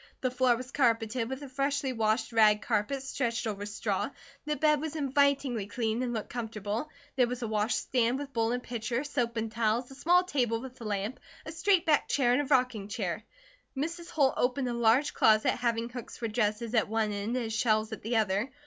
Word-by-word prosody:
The 255 Hz, -, 0 dB
floor 250 Hz, -1 st, +3 dB
was 255 Hz, +2 st, -7 dB
carpeted 230 Hz, -2 st, +1 dB
with 265 Hz, +2 st, -5 dB
a -, -, -6 dB
freshly 275 Hz, 0 st, -1 dB
washed 225 Hz, +1 st, 0 dB
rag 215 Hz, -1 st, +5 dB
carpet 240 Hz, +5 st, -1 dB
stretched 240 Hz, -4 st, -2 dB
over 205 Hz, -2 st, -3 dB
straw, 210 Hz, -, -2 dB, 0.4 s
the 300 Hz, 0 st, -1 dB
bed 300 Hz, -1 st, +3 dB
was 315 Hz, 0 st, -4 dB
invitingly 275 Hz, -6 st, +1 dB
clean 220 Hz, +2 st, -1 dB
and 250 Hz, -1 st, -1 dB
looked 220 Hz, -3 st, -4 dB
comfortable, 225 Hz, +2 st, -4 dB, 0.3 s
there 250 Hz, -2 st, +4 dB
was 250 Hz, 0 st, -4 dB
a -, -, -1 dB
wash 215 Hz, +1 st, 0 dB
stand 245 Hz, 0 st, +1 dB
with 280 Hz, -1 st, -7 dB
bowl 230 Hz, 0 st, +1 dB
and 245 Hz, 0 st, -2 dB
pitcher, 235 Hz, +2 st, -2 dB
soap 240 Hz, -5 st, -2 dB
and 225 Hz, 0 st, -2 dB
towels, 230 Hz, +2 st, 0 dB
a -, -, -8 dB
small 350 Hz, +6 st, +3 dB
table 245 Hz, -10 st, 0 dB
with 255 Hz, 0 st, -10 dB
a -, -, -6 dB
lamp, 205 Hz, +3 st, -2 dB, 0.3 s
a 315 Hz, -, -6 dB
straight 360 Hz, +2 st, +2 dB
backed 305 Hz, -3 st, +2 dB
chair 245 Hz, -4 st, +3 dB
and 255 Hz, -, +3 dB
a -, -, -3 dB
rocking 250 Hz, -7 st, +1 dB
chair. 205 Hz, -4 st, -3 dB, 0.5 s
Mrs. 335 Hz, +4 st, -3 dB
Holt 275 Hz, -4 st, +2 dB
opened 255 Hz, +1 st, +1 dB
a -, -, -2 dB
large 235 Hz, +4 st, +3 dB
closet 215 Hz, -1 st, +4 dB
having 235 Hz, -1 st, -1 dB
hooks 245 Hz, 0 st, -8 dB
for 235 Hz, -, -3 dB
dresses 215 Hz, +1 st, -1 dB
at 225 Hz, -3 st, +3 dB
one 220 Hz, -1 st, 0 dB
end 205 Hz, +4 st, -2 dB
and 225 Hz, -3 st, -2 dB
shelves 215 Hz, -1 st, +1 dB
at 220 Hz, -, -6 dB
the 230 Hz, +3 st, -2 dB
other. 210 Hz, +3 st, +1 dB
240 Hz, 210 wpm, -30 LUFS, 220-265 Hz, 0.5 s, rag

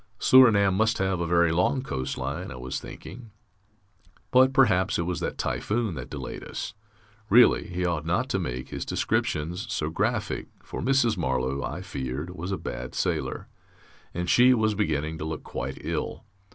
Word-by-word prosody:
Surinam 110 Hz, -8 st, +6 dB
must 110 Hz, +3 st, +2 dB
have 95 Hz, -1 st, 0 dB
a 85 Hz, -, -1 dB
very 85 Hz, -1 st, +3 dB
long 90 Hz, +10 st, +1 dB
coast 65 Hz, -, -3 dB
line, 70 Hz, +8 st, -4 dB
I 65 Hz, -, -7 dB
was 65 Hz, +1 st, -4 dB
thinking. 115 Hz, -2 st, -10 dB, 1.0 s
But 130 Hz, +1 st, +6 dB
perhaps 105 Hz, -8 st, +3 dB
it 85 Hz, -, 0 dB
was 90 Hz, -1 st, -2 dB
that -, -, -3 dB
typhoon 110 Hz, -2 st, -1 dB
that 65 Hz, -5 st, -7 dB
delayed -, -, -6 dB
us.... -, -, -5 dB, 0.6 s
Really, 120 Hz, +4 st, +6 dB
he 90 Hz, 0 st, -2 dB
ought 85 Hz, -4 st, -1 dB
not 85 Hz, +3 st, 0 dB
to -, -, 0 dB
make 65 Hz, 0 st, -4 dB
his -, -, -4 dB
descriptions 90 Hz, +9 st, -1 dB
so 80 Hz, -6 st, -1 dB
graphic, -, -, -1 dB, 0.2 s
for -, -, -6 dB
Mrs. 125 Hz, -5 st, +2 dB
Marlow, 65 Hz, -3 st, -1 dB
I 90 Hz, +5 st, -4 dB
feared, 70 Hz, -2 st, -4 dB
was 90 Hz, +3 st, -5 dB
a 95 Hz, -, -1 dB
bad 60 Hz, +1 st, -6 dB
sailor, -, -, -2 dB, 0.6 s
and 90 Hz, 0 st, -3 dB
she 125 Hz, +6 st, +6 dB
was 110 Hz, -2 st, +2 dB
beginning 80 Hz, -5 st, -1 dB
to -, -, -4 dB
look 80 Hz, -1 st, -5 dB
quite -, -, -5 dB
ill.... -, -, -3 dB
90 Hz, 170 wpm, -26 LUFS, 75-110 Hz, 1.0 s, Surinam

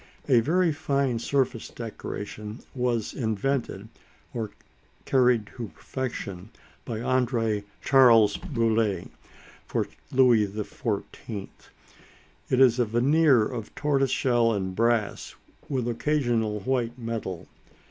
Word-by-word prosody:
A 130 Hz, -4 st, +5 dB
very 170 Hz, +7 st, +2 dB
fine 140 Hz, -5 st, 0 dB
surface 130 Hz, -2 st, -1 dB
decoration 105 Hz, -1 st, -7 dB
was 125 Hz, -4 st, -1 dB
invented, 120 Hz, +3 st, -2 dB, 0.5 s
or 110 Hz, -3 st, -3 dB, 0.6 s
carried 125 Hz, -4 st, +3 dB
to 120 Hz, -2 st, -4 dB
perfection, 100 Hz, -6 st, -6 dB, 0.4 s
by 115 Hz, -, -4 dB
André 115 Hz, -3 st, 0 dB, 0.2 s
Charles 115 Hz, -6 st, +6 dB
Boule, 115 Hz, -, 0 dB, 0.6 s
for -, -, -1 dB, 0.2 s
Louis 125 Hz, -5 st, +5 dB
XIV. 105 Hz, 0 st, -5 dB, 1.0 s
It 130 Hz, -, +2 dB
is 125 Hz, -2 st, +5 dB
a 120 Hz, -, +4 dB
veneer 130 Hz, +2 st, +4 dB
of 115 Hz, -3 st, -6 dB
tortoise 140 Hz, -2 st, +1 dB
shell 120 Hz, -3 st, +2 dB
and 95 Hz, -2 st, -3 dB
brass, 115 Hz, -1 st, 0 dB, 0.3 s
with 130 Hz, -4 st, -1 dB
occasional 120 Hz, -5 st, 0 dB
white 120 Hz, 0 st, -1 dB
metal. 115 Hz, -7 st, -5 dB
120 Hz, 105 wpm, -26 LUFS, 110-130 Hz, 1.0 s, Charles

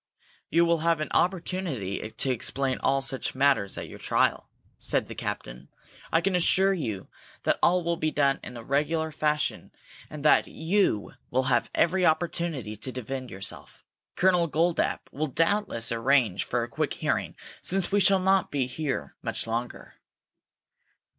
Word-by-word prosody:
"You 170 Hz, +1 st, +4 dB
will 170 Hz, -1 st, +2 dB
have 165 Hz, 0 st, +2 dB
an 155 Hz, -, -4 dB
opportunity 170 Hz, -, -1 dB
to 115 Hz, +4 st, -1 dB
explain 130 Hz, +2 st, 0 dB
all 135 Hz, 0 st, +1 dB
such 135 Hz, -1 st, -2 dB
matters 135 Hz, -8 st, +2 dB
at -, -, -5 dB
your -, -, -11 dB
trial," -, -, +1 dB, 0.3 s
said -, -, 0 dB
the -, -, -7 dB
captain. 60 Hz, +3 st, -6 dB, 0.4 s
"I 165 Hz, -, +3 dB
can 190 Hz, +1 st, 0 dB
assure 190 Hz, +2 st, +4 dB
you 115 Hz, -, -4 dB, 0.4 s
that -, -, +1 dB
all 180 Hz, +1 st, +3 dB
will 170 Hz, 0 st, 0 dB
be 155 Hz, -, 0 dB
done 140 Hz, -2 st, +2 dB
in 125 Hz, -, -8 dB
a 115 Hz, -, -8 dB
regular 155 Hz, +5 st, 0 dB
fashion, 150 Hz, 0 st, -1 dB, 0.4 s
and 150 Hz, -1 st, -8 dB
that 150 Hz, -, +5 dB
you 160 Hz, -, 0 dB, 0.2 s
will 130 Hz, +2 st, +1 dB
have -, -, +1 dB
every 185 Hz, +3 st, +2 dB
opportunity 160 Hz, -8 st, 0 dB
to 130 Hz, +5 st, -4 dB
defend 130 Hz, +1 st, -5 dB
yourself. 95 Hz, -1 st, -8 dB, 0.3 s
Colonel 180 Hz, -2 st, +3 dB
Goldapp 165 Hz, +2 st, 0 dB
will 155 Hz, +3 st, -2 dB
doubtless 165 Hz, -, 0 dB
arrange 115 Hz, -3 st, +2 dB
for -, -, -1 dB
a -, -, -4 dB
quick -, -, -2 dB
hearing -, -, -1 dB, 0.3 s
since 190 Hz, +1 st, +1 dB
we 205 Hz, -, +3 dB
shall 195 Hz, 0 st, +5 dB
not 190 Hz, 0 st, +2 dB
be 140 Hz, -3 st, 0 dB
here 135 Hz, +2 st, -4 dB
much -, -, -2 dB
longer." 115 Hz, +2 st, -4 dB
150 Hz, 160 wpm, -27 LUFS, 125-170 Hz, 0.4 s, that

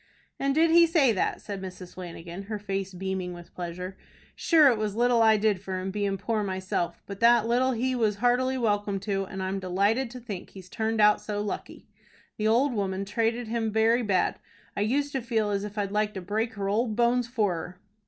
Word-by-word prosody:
"And 275 Hz, 0 st, 0 dB
did 325 Hz, +1 st, +4 dB
he 335 Hz, 0 st, +7 dB
say 315 Hz, -7 st, +4 dB
that?" 200 Hz, -, -1 dB
said 200 Hz, -2 st, -6 dB
Mrs. 185 Hz, -1 st, -8 dB
Flanagan, 175 Hz, 0 st, -8 dB
her 215 Hz, +1 st, -4 dB
face 195 Hz, -2 st, -3 dB
beaming 185 Hz, -1 st, -4 dB
with 175 Hz, -1 st, -12 dB
pleasure. 180 Hz, +2 st, -6 dB, 0.4 s
"Shure 315 Hz, -4 st, +5 dB
it 235 Hz, -4 st, +1 dB
was 210 Hz, -2 st, -2 dB
little 240 Hz, 0 st, +3 dB
I 220 Hz, -1 st, +6 dB
did 210 Hz, -3 st, +1 dB
for 190 Hz, -1 st, -4 dB
him, 190 Hz, +1 st, -4 dB
bein' 200 Hz, -1 st, -1 dB
poor 215 Hz, +2 st, -1 dB
myself; 185 Hz, -3 st, -3 dB
but 200 Hz, -1 st, -8 dB
that 235 Hz, -1 st, +5 dB
little 255 Hz, +2 st, +2 dB
he 255 Hz, +3 st, 0 dB
was 220 Hz, -4 st, +1 dB
heartily 250 Hz, +4 st, +1 dB
welcome 205 Hz, -4 st, 0 dB
to, 195 Hz, -1 st, -1 dB
and 190 Hz, 0 st, -6 dB
I'm 190 Hz, +1 st, -2 dB
delighted 200 Hz, +7 st, +1 dB
to 250 Hz, +1 st, -9 dB
think 210 Hz, -6 st, -7 dB
he's 185 Hz, -2 st, -12 dB
turned 220 Hz, +2 st, -1 dB
out 210 Hz, 0 st, +5 dB
so 205 Hz, -1 st, -4 dB
lucky. 205 Hz, -1 st, -5 dB, 0.5 s
The 215 Hz, -, 0 dB
ould 245 Hz, +5 st, +3 dB
woman 195 Hz, -2 st, -2 dB
trated 230 Hz, +3 st, -1 dB
him 225 Hz, -1 st, -1 dB
very 225 Hz, +3 st, +3 dB
bad. 195 Hz, -5 st, +1 dB, 0.4 s
I -, -, -1 dB
used 280 Hz, +7 st, 0 dB
to 270 Hz, -, -2 dB
feel 225 Hz, -3 st, 0 dB
as 200 Hz, 0 st, -1 dB
if 210 Hz, +1 st, -7 dB
I'd 200 Hz, -1 st, -1 dB
like 210 Hz, 0 st, 0 dB
to 190 Hz, -, -4 dB
break 220 Hz, +5 st, -2 dB
her 200 Hz, -1 st, -3 dB
ould 215 Hz, +2 st, 0 dB
bones 240 Hz, +1 st, +2 dB
for 220 Hz, -6 st, 0 dB
her." 180 Hz, +2 st, -7 dB
210 Hz, 210 wpm, -27 LUFS, 195-235 Hz, 0.5 s, he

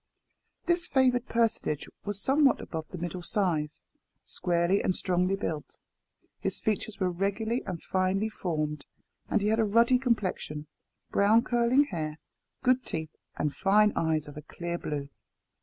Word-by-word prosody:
This 345 Hz, 0 st, +2 dB
favoured 255 Hz, -4 st, +2 dB
personage 225 Hz, -10 st, 0 dB, 0.2 s
was 205 Hz, -1 st, -1 dB
somewhat 275 Hz, +4 st, +4 dB
above 160 Hz, -2 st, -6 dB
the 185 Hz, -, -7 dB
middle 175 Hz, +1 st, -4 dB
Size, 170 Hz, -6 st, -1 dB, 0.4 s
squarely 175 Hz, +2 st, +1 dB
and 185 Hz, -, 0 dB
strongly 185 Hz, +1 st, +1 dB
built. 160 Hz, -6 st, -4 dB, 0.6 s
His -, -, -1 dB
features 215 Hz, 0 st, -2 dB
were 185 Hz, -2 st, +1 dB
regularly 200 Hz, +6 st, -1 dB
and 175 Hz, -3 st, -5 dB
finely 190 Hz, +3 st, +1 dB
formed, 155 Hz, -8 st, -3 dB, 0.4 s
and 220 Hz, -, +2 dB
he 210 Hz, -, +2 dB
had 220 Hz, +1 st, +2 dB
a -, -, +4 dB
ruddy 235 Hz, +4 st, +4 dB
complexion, 190 Hz, -, -1 dB, 0.5 s
brown 215 Hz, +3 st, +4 dB
curling 240 Hz, +3 st, +3 dB
hair, 155 Hz, -, -4 dB, 0.5 s
good 255 Hz, 0 st, +3 dB
teeth, 160 Hz, -5 st, -4 dB, 0.2 s
and 150 Hz, -1 st, -1 dB
fine 210 Hz, +2 st, +4 dB
eyes 160 Hz, -2 st, 0 dB
of 145 Hz, -, -10 dB
a -, -, -6 dB
clear 170 Hz, +2 st, -5 dB
blue. 145 Hz, -2 st, -4 dB
195 Hz, 145 wpm, -29 LUFS, 165-230 Hz, 0.6 s, somewhat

